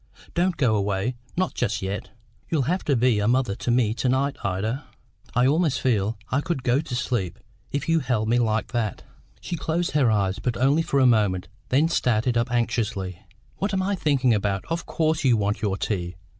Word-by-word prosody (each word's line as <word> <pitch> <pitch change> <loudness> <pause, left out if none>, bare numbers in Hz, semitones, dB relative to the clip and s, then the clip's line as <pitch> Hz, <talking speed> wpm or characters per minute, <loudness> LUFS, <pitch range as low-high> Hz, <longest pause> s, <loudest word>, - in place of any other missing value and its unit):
Don't 175 0 +1
go 125 -6 +3
away, 100 +3 0 0.2
not 185 0 0
just 105 - -1
yet. 95 0 -4 0.4
You'll 155 -5 +1
have 180 +8 -1
to 140 - +2
be 120 -2 +3
a 105 - +1
mother 125 -3 +2
to - - -4
me 120 -3 +3
to 125 +2 -1
night, 135 +2 +1
Ida. 110 +9 -2 0.5
I 125 +1 +4
almost 150 +1 +2
feel 110 -4 +1
I 135 - +2
could 160 -6 -3
go 125 +3 +2
to 140 -6 -5
sleep, 110 -8 -2 0.3
if 140 - -2
you 165 0 +3
held 120 -6 0
me 120 +2 +3
like 110 -2 0
that." 115 -4 -2 0.4
She 175 - -4
closed 170 +2 -1
her 140 -5 +3
eyes, 100 -3 +1
but 125 -2 -2
only 140 +6 +3
for 140 -3 0
a 130 - +5
moment, 105 -7 +2 0.2
then 145 +5 +4
started 120 -7 +1
up 115 +1 +1
anxiously. 110 -6 -1 0.4
"What 200 0 -1
am 190 - +1
I 200 +2 0
thinking 140 -9 +2
about! 100 -2 -1
Of 165 0 -2
course 160 -1 0
you 125 -4 +4
want 105 0 -1
your 100 -3 0
tea." 90 -5 -2
125 Hz, 200 wpm, -24 LUFS, 105-145 Hz, 0.5 s, a